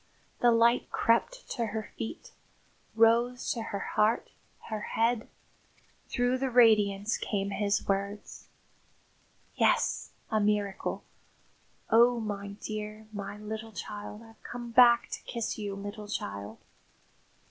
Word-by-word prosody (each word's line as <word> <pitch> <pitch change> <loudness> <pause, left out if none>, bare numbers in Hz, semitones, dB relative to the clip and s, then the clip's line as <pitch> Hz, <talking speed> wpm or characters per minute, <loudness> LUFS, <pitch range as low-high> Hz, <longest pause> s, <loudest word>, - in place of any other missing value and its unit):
The 240 - +5
light 235 +1 +3
crept - - +1
to 235 -3 -1
her 215 0 -5
feet, 230 +9 -6 0.6
rose 235 +2 +3
to 235 - -2
her 220 -2 -4 0.2
heart, 215 +2 +2 0.4
her 215 -1 -3
head. 230 +1 0 0.8
Through 245 +1 +1
the 265 0 0
radiance 215 -3 +4
came 200 -1 -2
his 200 0 0
words. 200 +1 -3 1.1
"Yes, - - +2 0.2
a 215 - +3
miracle. 205 -2 0 0.9
Oh, 235 +2 +6
my 200 -2 -4
dear 215 0 -5
my 200 0 -5
little 220 +1 -6
child! 210 +3 -7
I've 225 -1 -17
come 240 -1 -7
back 240 0 +6
to - - -5
kiss 230 -2 -4
you, 200 -2 -3
little 205 +1 -7
child." 100 - -5
220 Hz, 120 wpm, -29 LUFS, 205-235 Hz, 1.1 s, Oh